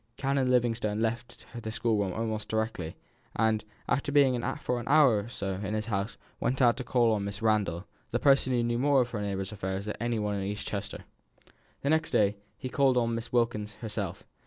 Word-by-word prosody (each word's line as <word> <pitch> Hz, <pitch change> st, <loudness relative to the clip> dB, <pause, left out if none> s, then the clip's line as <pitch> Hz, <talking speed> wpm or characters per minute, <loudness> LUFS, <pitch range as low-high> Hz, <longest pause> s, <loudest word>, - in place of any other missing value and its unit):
Canon 135 Hz, -1 st, +1 dB
Livingstone 115 Hz, -4 st, +1 dB
left 115 Hz, +2 st, -3 dB
the 115 Hz, -2 st, -5 dB
schoolroom 110 Hz, -3 st, 0 dB
almost 110 Hz, -1 st, -3 dB
directly, 110 Hz, -7 st, -2 dB, 0.4 s
and, 110 Hz, -1 st, +2 dB, 0.2 s
after 145 Hz, +2 st, 0 dB
being 135 Hz, -4 st, +4 dB
for 125 Hz, -4 st, -2 dB
an 120 Hz, -, -7 dB
hour 140 Hz, -7 st, +6 dB
or 105 Hz, +3 st, -6 dB
so 100 Hz, -4 st, -3 dB
in 105 Hz, +2 st, -2 dB
his 110 Hz, 0 st, -2 dB
house, 105 Hz, 0 st, -2 dB, 0.2 s
went 125 Hz, +2 st, 0 dB
out 120 Hz, -3 st, +5 dB
to 130 Hz, -, -3 dB
call 120 Hz, -2 st, +3 dB
on 105 Hz, -2 st, 0 dB
Mrs. 100 Hz, +1 st, -5 dB
Randall, 105 Hz, -5 st, +1 dB, 0.2 s
the 120 Hz, -, 0 dB
person 135 Hz, 0 st, +4 dB
who 120 Hz, -1 st, +2 dB
knew 120 Hz, 0 st, 0 dB
more 140 Hz, 0 st, +4 dB
of 120 Hz, -1 st, -2 dB
her 105 Hz, -, -3 dB
neighbours' 95 Hz, -1 st, -3 dB
affairs 95 Hz, -1 st, -3 dB
than 105 Hz, -, -3 dB
any 120 Hz, -1 st, 0 dB
one 105 Hz, -1 st, -1 dB
in 100 Hz, -, -2 dB
East 105 Hz, +2 st, -4 dB
Chester. 100 Hz, -1 st, -4 dB, 0.8 s
The 140 Hz, -, +1 dB
next 160 Hz, +1 st, +2 dB
day 105 Hz, 0 st, +2 dB, 0.2 s
he -, -, -5 dB
called 130 Hz, -1 st, +3 dB
on 115 Hz, -1 st, +2 dB
Miss 115 Hz, +1 st, -4 dB
Wilkins 115 Hz, -3 st, 0 dB
herself. 105 Hz, -4 st, -4 dB
115 Hz, 205 wpm, -29 LUFS, 105-125 Hz, 0.8 s, hour